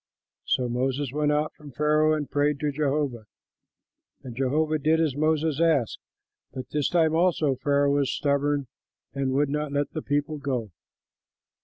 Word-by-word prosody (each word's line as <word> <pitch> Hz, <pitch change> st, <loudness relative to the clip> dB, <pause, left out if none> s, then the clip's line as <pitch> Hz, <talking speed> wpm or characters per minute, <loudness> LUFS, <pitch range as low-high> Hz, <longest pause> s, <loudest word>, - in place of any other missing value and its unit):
So 125 Hz, -, +1 dB
Moses 130 Hz, +2 st, -1 dB
went 150 Hz, 0 st, +1 dB
out 150 Hz, +1 st, 0 dB
from 150 Hz, -2 st, -13 dB
Pharaoh 150 Hz, +2 st, +3 dB
and 150 Hz, -2 st, -3 dB
prayed 145 Hz, 0 st, 0 dB
to 150 Hz, -1 st, 0 dB
Jehovah. 140 Hz, -5 st, -1 dB, 1.0 s
And 125 Hz, -3 st, -8 dB
Jehovah 150 Hz, +4 st, 0 dB
did 155 Hz, +3 st, +2 dB
as 155 Hz, -5 st, +1 dB
Moses 155 Hz, 0 st, +1 dB
asked; 150 Hz, -9 st, +2 dB, 0.5 s
but 130 Hz, -1 st, -7 dB
this 150 Hz, -2 st, 0 dB
time 160 Hz, -2 st, +2 dB
also 165 Hz, -4 st, +2 dB
Pharaoh 140 Hz, 0 st, +2 dB
was 140 Hz, -2 st, +1 dB
stubborn 145 Hz, 0 st, 0 dB, 0.5 s
and 135 Hz, -1 st, -1 dB
would 145 Hz, +1 st, +2 dB
not 150 Hz, 0 st, -2 dB
let 145 Hz, 0 st, -1 dB
the 155 Hz, -, -4 dB
people 145 Hz, +1 st, -2 dB
go. 125 Hz, -7 st, -3 dB
145 Hz, 155 wpm, -26 LUFS, 135-155 Hz, 1.0 s, Pharaoh